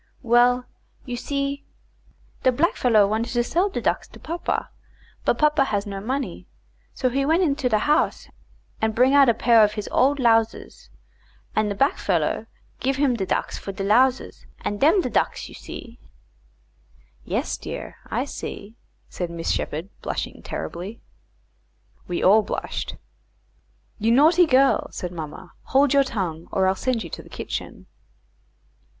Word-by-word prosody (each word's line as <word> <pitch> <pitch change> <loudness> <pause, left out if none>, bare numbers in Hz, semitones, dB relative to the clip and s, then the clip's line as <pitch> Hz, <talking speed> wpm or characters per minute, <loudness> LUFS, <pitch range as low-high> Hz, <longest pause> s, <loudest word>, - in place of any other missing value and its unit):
"Well, 245 +1 +4 0.4
you 245 -2 -4
see, 280 +2 -3 0.8
de 255 - +4
blackfellow 245 - +3
want 220 +3 -1
to 240 0 0
sell 355 +11 +1
de - - -3
ducks - - -1
to - - -15
papa, 335 +2 -3 0.5
but - - +2
papa 300 -2 +3
has 205 -4 -1
no 195 -1 -5
money, 250 -3 -4 0.4
so 255 - -1
he 270 +3 0
went 325 +6 +3
into 280 -5 +1
de 215 - +3
house 295 +8 +1 0.5
and 220 -1 0
bring 255 +3 +4
out 280 -3 +7
a 235 - +3
pair 230 -1 +5
of 210 0 +2
his 210 -1 -5
old 280 +2 +3
lowsers, 225 -3 +1 0.7
and 215 -1 +2
de 200 - -2
blackfellow 200 - 0 0.3
give 270 +2 0
him 275 -2 +2
de 195 -4 -3
ducks - - -2
for 195 - -6
de 195 0 -5
lowsers, 250 +6 +2
and 205 - -3
dems 330 +6 +5
de - - -2
ducks - - 0
you - - -13
see." 235 +1 -10 1.2
"Yes, - - -2
dear; - - -7
I - - -1
see," 210 +3 -8 0.3
said 175 -2 -4
Miss 170 -1 -3
Sheppard, 160 +6 -3
blushing - - -4
terribly. 190 +7 -6 1.1
We 175 - -2
all 210 +4 +6
blushed. - - -4 1.0
"You 220 +2 +2
naughty 325 +7 +5
girl," 270 0 +4
said 180 - -5
mamma; 170 +2 -8
"hold 275 +1 +3
your 280 0 +5
tongue, 175 -10 -4
or 190 - +2
I'll 190 - +3
send 235 +3 -1
you - - -9
to - - -6
the - - -16
kitchen." - - -6
240 Hz, 155 wpm, -23 LUFS, 205-275 Hz, 1.2 s, out